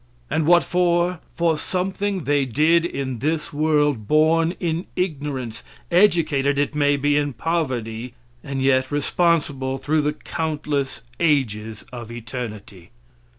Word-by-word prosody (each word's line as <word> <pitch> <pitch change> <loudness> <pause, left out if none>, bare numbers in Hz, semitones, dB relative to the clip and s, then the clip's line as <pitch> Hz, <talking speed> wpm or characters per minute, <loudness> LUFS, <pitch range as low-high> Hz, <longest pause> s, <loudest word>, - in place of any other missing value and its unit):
And 155 -1 +1
what 175 0 +6
for? 175 0 +1 0.2
For 165 -2 +1
something 190 +1 -2
they 145 0 +2
did 155 +7 +3
in 130 -7 -3
this 155 +3 -2
world; 145 -6 +1
born 160 +3 +3
in 170 0 -2
ignorance, 140 -9 -3 0.3
educated 160 -7 +3
it 145 +1 0
may 145 -1 +2
be 145 +1 +2
in 145 -1 0
poverty, 125 -5 -2 0.3
and 135 -2 -3
yet 130 -1 +3
responsible 145 -3 0
through 155 +3 +1
the 150 0 0
countless 150 -4 -3 0.2
ages 110 -9 0
of 120 -2 -7
eternity. 110 -6 -7
145 Hz, 125 wpm, -22 LUFS, 130-165 Hz, 0.3 s, what